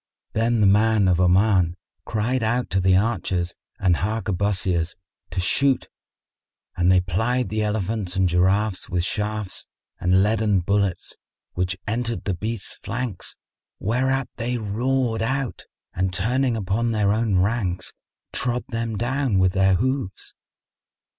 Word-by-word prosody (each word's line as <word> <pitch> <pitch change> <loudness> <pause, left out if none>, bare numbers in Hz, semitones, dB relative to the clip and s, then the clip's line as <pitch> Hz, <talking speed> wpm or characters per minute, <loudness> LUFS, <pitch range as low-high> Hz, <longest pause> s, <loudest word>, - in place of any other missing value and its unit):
Then 115 0 +1
the - - +5
man 105 0 +4
of 90 -1 +3
Oman 90 -1 +3 0.3
cried 115 +4 0
out 120 +3 0
to 95 - +2
the 95 0 +4
archers 95 -5 0 0.3
and 90 -3 +3
harquebusiers 95 -4 0 0.3
to 85 +2 -3
shoot, 130 +8 +2 0.9
and 90 +1 +3
they 90 -1 +5
plied 110 +8 0
the 110 0 -1
elephants 105 -2 -1
and 95 -1 +3
giraffes 95 +3 +1
with 90 -1 0
shafts 105 0 -3 0.3
and 90 +1 +3
leaden 105 -2 +2
bullets, 100 0 0 0.4
which 90 +1 -1
entered 115 +2 -2
the 100 - -1
beasts' 105 +4 -5
flanks, 120 -5 -5 0.4
whereat 130 +5 0
they 120 +1 -1
roared 115 +2 0
out 130 +2 -2 0.3
and 95 +1 0
turning 120 +6 +1
upon 105 +4 0
their 105 -2 +2
own 110 -3 +1
ranks, 95 -3 0 0.4
trod 125 0 -1
them 115 -3 -3
down 125 -1 0
with 95 -1 +4
their 95 0 +3
hoofs. 125 -2 -2
105 Hz, 135 wpm, -23 LUFS, 95-115 Hz, 0.9 s, the